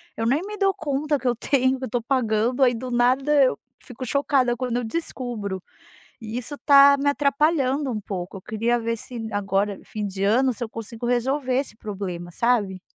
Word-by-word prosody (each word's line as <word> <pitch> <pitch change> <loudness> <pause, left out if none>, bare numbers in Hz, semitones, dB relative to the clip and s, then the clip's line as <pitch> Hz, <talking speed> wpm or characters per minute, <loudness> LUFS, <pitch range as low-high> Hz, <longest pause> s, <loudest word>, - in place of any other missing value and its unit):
eu 225 - -2
nem 270 +8 +2
me 420 +1 -6
dou 390 -1 +2
conta 295 -1 -1
que 260 - -3
eu 245 - +2
tenho, 260 +1 +1
que 260 - -9
eu - - -7
tô 240 +1 -1
pagando, 240 0 +1
aí 245 -1 +5
do 250 +2 -5
nada 265 +4 +3
eu 255 - +1 0.2
fico 255 +1 -8
chocada 265 -1 +1
quando 245 -1 -2
eu 245 - -1
descubro, 220 - -4 0.6
e 225 +2 -5
isso 255 +4 -5
tá 280 -1 +7
me 285 +1 +1
atrapalhando 285 -1 +1
um 220 - -2
pouco, 195 -2 -6
eu - - -11
queria 230 +4 0
ver 230 0 -1
se 230 0 -7
agora 200 0 -1
fim 210 -1 -5
de 195 0 -4
ano, 245 +5 +3
se 240 - -5
eu 225 - -5
consigo 225 +1 -7
resolver 255 +2 0
esse 270 -6 -5
problema, 190 -5 -6
sabe. 205 -3 +1
245 Hz, 200 wpm, -24 LUFS, 220-275 Hz, 0.6 s, tá